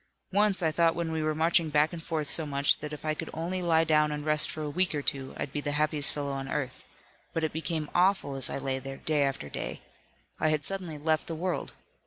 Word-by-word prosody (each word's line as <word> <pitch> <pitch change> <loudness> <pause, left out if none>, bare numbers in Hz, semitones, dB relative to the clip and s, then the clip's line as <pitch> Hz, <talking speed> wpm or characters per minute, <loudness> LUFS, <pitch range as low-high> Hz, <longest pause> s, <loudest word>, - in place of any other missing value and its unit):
Once, 200 -2 +2
I 160 - +3
thought 165 +1 +3
when 170 -1 -2
we 160 0 -1
were 155 0 0
marching 165 +1 +3
back 150 +2 +3
and 170 - -6
forth 155 -3 -2
so 160 +1 +3
much 140 0 +2
that 150 0 -6
if 150 0 -7
I 155 - +1
could - - -6
only 175 +3 -2
lie 165 -2 +4
down 150 -1 +3
and 150 0 -4
rest 150 0 +5
for 155 - -4
a - - -2
week 180 +1 +1
or 145 - -2
two 135 -1 -3
I'd 140 - -4
be 145 - -1
the 145 0 -2
happiest 150 -1 +2
fellow 145 -1 -3
on 135 0 -4
earth. 135 -2 -3 0.5
But 165 - 0
it 160 - 0
became 160 -1 -1
awful 185 -5 +3
as 135 -1 -2
I - - -3
lay 135 -1 -2
there, 135 +1 -7
day 155 -2 +1
after 135 - -1
day. - - -5 0.6
I 155 - +2
had 155 -2 +1
suddenly 185 -5 -3
left 155 +1 0
the 165 - -3
world. 175 +2 -2
155 Hz, 250 wpm, -29 LUFS, 145-165 Hz, 0.6 s, rest